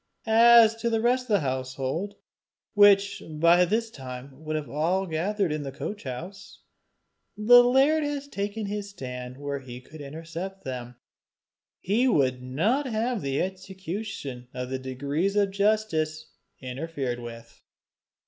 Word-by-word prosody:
As 230 0 +7
to 235 +1 -1
the 225 -1 +1
rest 250 +2 +2
of 220 -4 +2
the - - +3
household, 130 +8 -3 0.6
which 200 -1 +5
would 155 -1 -9
by 170 +2 +6
this 225 +4 -1
time 130 - -8
have 140 +3 -17
been 155 -1 -2
all 175 +6 0
gathered 185 +2 -1
in 150 0 -2
the 140 -1 -5
coach 205 +8 -6
house, 175 +10 -8 0.7
the 245 +3 +8
laird 270 +5 +4
had 285 -1 -4
taken 205 +2 -3
his 205 0 -4
stand 125 -7 -7
where 140 0 -4
he 125 -2 -9
could 150 +4 -13
intercept 165 +6 -7
them: 125 -2 -6 0.8
he 225 +7 +1
would 130 - +2
not 195 - 0
have 230 -1 -1
the 140 0 0
execution 190 - -6
of 125 0 -4
the 130 - -2
decrees 140 +9 -2
of 200 -1 +2
justice 180 -7 0 0.3
interfered 130 -1 -4
with. 115 -1 -10
170 Hz, 145 wpm, -26 LUFS, 135-210 Hz, 0.8 s, the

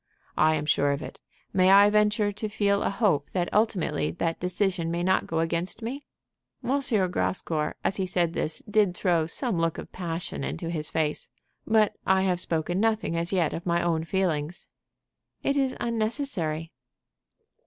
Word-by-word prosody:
"I 155 0 +5
am 150 -1 -2
sure 145 -1 +2
of 140 +2 -4
it. - - -9 0.3
May 185 0 +4
I 200 +1 +8
venture 210 0 +2
to 210 +1 -4
feel 200 -1 +1
a - - +1
hope 195 -9 +1
that 175 -2 -1
ultimately 195 - +1
that 165 - -2
decision 180 -1 0
may 170 +1 -1
not 185 +1 +2
go 165 0 0
against 170 +6 -2
me?" 260 +5 -4 0.6
M. 275 +3 +1 0.3
Grascour, 160 -4 -1
as 195 - 0
he 190 -1 -1
said 175 -2 0
this, 155 - -3
did 205 -3 +2
throw 170 -4 +2
some 215 - -1
look 165 -1 0
of - - -8
passion 165 - -4
into 75 - -4
his 155 -3 -2
face. 155 -2 -1 0.4
"But 220 -2 +3
I 190 0 +3
have 180 -2 +1
spoken 175 +1 -1
nothing 220 -5 +1
as 170 +1 -1
yet 175 -5 +1
of 170 - -5
my 170 0 +2
own 165 -2 +1
feelings." 165 -2 -2 0.8
"It 280 - +1
is 270 -2 0
unnecessary." 215 - -2
180 Hz, 170 wpm, -27 LUFS, 165-210 Hz, 0.8 s, I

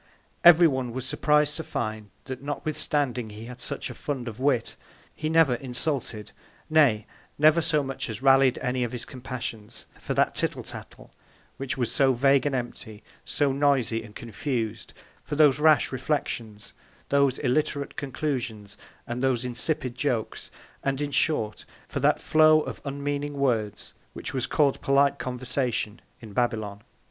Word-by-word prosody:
Every 175 0 +9
one 130 -5 -2
was 130 0 -4
surpriz'd 150 +1 +2
to 160 - -4
find, 110 -6 -4 0.2
that 130 -1 -6
notwithstanding 145 -5 -1
he 105 +2 -9
had 125 +1 -9
such - - -3
a - - -7
Fund 135 -4 -4
of 115 0 -7
Wit, 130 -3 +1 0.4
he 155 - -3
never 160 -5 +4
insulted; 125 -3 -2 0.4
nay, 130 -10 +4 0.3
never 155 +3 +5
so 155 -2 +1
much 135 -2 -4
as 110 -2 -5
rallied 135 -1 +5
any 125 -1 0
of 120 - -3
his 120 - -5
Companions, 120 -4 -7
for - - -4
that - - +2
Tittle - - -1
Tattle, - - -9 0.5
which 135 0 -4
was 120 -3 -1
so 135 -1 +3
vague 135 +2 +3
and 140 - -1
empty, 115 -3 -6 0.2
so 145 -2 +1
noisy 135 -5 +1
and 110 -2 -13
confus'd; 115 -1 -4 0.3
for - - -4
those 145 -2 +5
rash 155 0 +4
Reflections, 120 -6 -3 0.4
those 140 -2 +3
illiterate 145 +1 -1
Conclusions, 125 -8 -4 0.3
and 120 +2 -4
those 130 -2 +1
insipid 125 +2 -1
Jokes; 125 -4 -2 0.3
and, 135 0 -1
in 145 -1 -2
short, 110 -9 +1 0.2
for - - -4
that - - +3
Flow 155 0 +5
of - - -7
unmeaning 145 +1 -3
Words, 115 -7 -1 0.2
which - - -5
was 130 -2 -1
call'd 145 -3 +2
polite 140 0 +3
Conversation 125 -3 -2 0.2
in 110 -3 -10
Babylon. 110 -4 -1
130 Hz, 155 wpm, -26 LUFS, 120-145 Hz, 0.5 s, Every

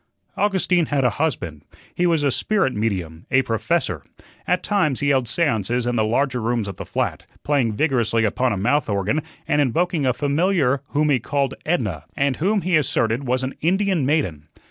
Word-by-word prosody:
Augustine 185 -5 +1
had 140 -2 0
a 125 - +3
husband. 90 - -2 0.3
He 180 - +1
was 165 -3 +2
a 140 - +2
spirit 195 - +1
medium 90 -7 -3
a 130 0 +3
"professor." 115 - -1 0.4
At 180 - +1
times 180 - +1
he 145 - +1
held 130 -3 +2
seances 120 - 0
in 120 0 0
the 110 - +2
larger 125 +3 0
rooms 115 -1 -1
of 100 - -6
the - - -7
flat, - - -2 0.2
playing 135 -7 +1
vigorously 115 -4 +1
upon 125 +4 +1
a 105 - -1
mouth 140 +8 +1
organ 100 +9 0 0.3
and 145 - +2
invoking 160 +2 +1
a 125 - +3
familiar 145 0 +1
whom 150 +1 +1
he 130 - +3
called 140 +3 -1
"Edna," 105 - -1
and 140 -1 +1
whom 200 +5 +1
he 180 +1 +1
asserted 135 -4 +1
was 130 +1 0
an 130 - -3
Indian 190 -1 +1
maiden. 130 - -1
135 Hz, 185 wpm, -22 LUFS, 115-155 Hz, 0.4 s, a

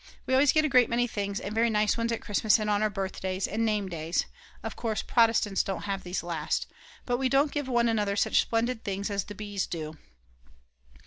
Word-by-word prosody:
We 260 - -1
always 270 +2 +5
get 310 0 +3
a - - +3
great 250 -4 +4
many 240 +1 +2
things 200 -3 -3
and 200 - -5
very 230 +1 +3
nice 210 -1 +2
ones 230 0 -1
at 230 - -3
Christmas 210 +1 +3
and 210 -1 -1
on 205 0 +2
our 215 - +2
birthdays 190 -1 -3
and 220 +3 -1
name 210 -3 0
days 165 -1 -1 0.4
(of - - -5
course 220 -3 -2
Protestants 225 -4 +3
don't 195 -3 -4
have 195 -1 -2
these 180 0 -3
last), 165 -3 -2 0.4
but 245 -1 0
we 260 0 0
don't 275 +2 +3
give 290 -3 -3
one 240 -2 +2
another 210 -3 +1
such 200 - +3
splendid 230 +1 -1
things 200 +1 -3
as 200 -1 -1
the 205 - -9
Bs. 205 -1 -3
do. 155 -2 -5
210 Hz, 215 wpm, -28 LUFS, 195-235 Hz, 0.4 s, always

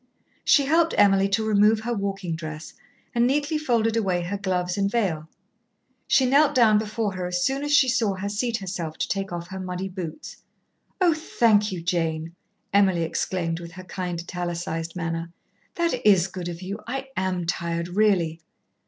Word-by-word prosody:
She 280 - +5
helped 325 +3 +3
Emily 195 -1 +5
to 215 +3 +1
remove 215 +1 +4
her 240 +2 -2
walking 195 -5 -3
dress, 155 -1 -7 0.4
and 235 0 +3
neatly 290 +3 0
folded 230 -6 +1
away 185 -6 0
her 180 +4 -3
gloves 180 -2 -1
and 200 -1 +1
veil. 175 -9 -1 0.8
She 265 - +4
knelt 285 +3 +4
down 220 -4 +5
before 215 -1 -2
her 180 -1 -3
as 180 0 -1
soon 270 +1 0
as 290 - -2
she 290 -2 +6
saw 235 -6 +1
her 190 +2 -4
seat 225 +3 -1
herself 175 -5 -5
to - - -1
take 195 -1 -2
off 175 0 -5
her 190 -1 -6
muddy 185 +1 -4
boots. 185 - -7 0.6
"Oh, 355 -3 +4
thank 220 -9 +2
you, 175 -3 -5
Jane," 165 -2 -1 0.4
Emily 190 -4 +4
exclaimed, 165 0 -2
with 170 -1 -9
her 185 +1 -9
kind 180 -2 -4
italicised 170 -1 -4
manner. 165 -1 -3 0.4
"That 335 -8 0
is 195 -5 +5
good 180 -2 -6
of 170 +1 -7
you. 200 +3 -5
I 270 +2 -4
am 185 -2 -1
tired, 170 0 -2
really. 180 -5 +2
195 Hz, 175 wpm, -25 LUFS, 175-225 Hz, 0.8 s, she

